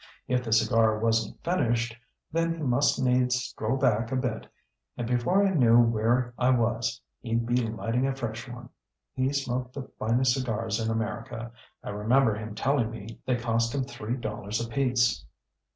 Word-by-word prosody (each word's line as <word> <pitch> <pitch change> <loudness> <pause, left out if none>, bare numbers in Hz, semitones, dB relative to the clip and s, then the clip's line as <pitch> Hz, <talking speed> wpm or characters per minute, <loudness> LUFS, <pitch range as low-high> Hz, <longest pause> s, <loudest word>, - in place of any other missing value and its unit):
If 125 0 +1
the 115 - -5
cigar 110 0 +3
wasn't 115 0 0
finished, 120 -9 0 0.4
then 165 +1 0
he 160 - -5
must 135 +1 +2
needs 125 -1 +2
stroll 125 -1 -2
back 115 -4 +1
a - - 0
bit, 125 -4 -2 0.5
and 120 - -2
before 125 +12 +2
I 195 - +2
knew 120 -7 +5
where 120 +2 +2
I 125 0 +3
was 115 -1 +1 0.2
he'd 115 0 -1
be 120 +1 +1
lighting 115 +3 -1
a 135 - -1
fresh 120 -2 -5
one. 120 0 -9 0.4
He 130 +1 0
smoked 130 -2 -2
the 135 -2 -7
finest 120 +3 +2
cigars 115 -4 -2
in 110 0 -1
America. 115 +1 -3 0.3
I - - -5
remember 110 +4 +3
him 105 0 -6
telling 135 -3 +1
me 115 -1 -9
they 130 - +2
cost 115 +1 0
him 135 - 0
three 120 -3 -4
dollars 105 -2 -4
apiece." 120 - +1
120 Hz, 170 wpm, -27 LUFS, 115-130 Hz, 0.5 s, knew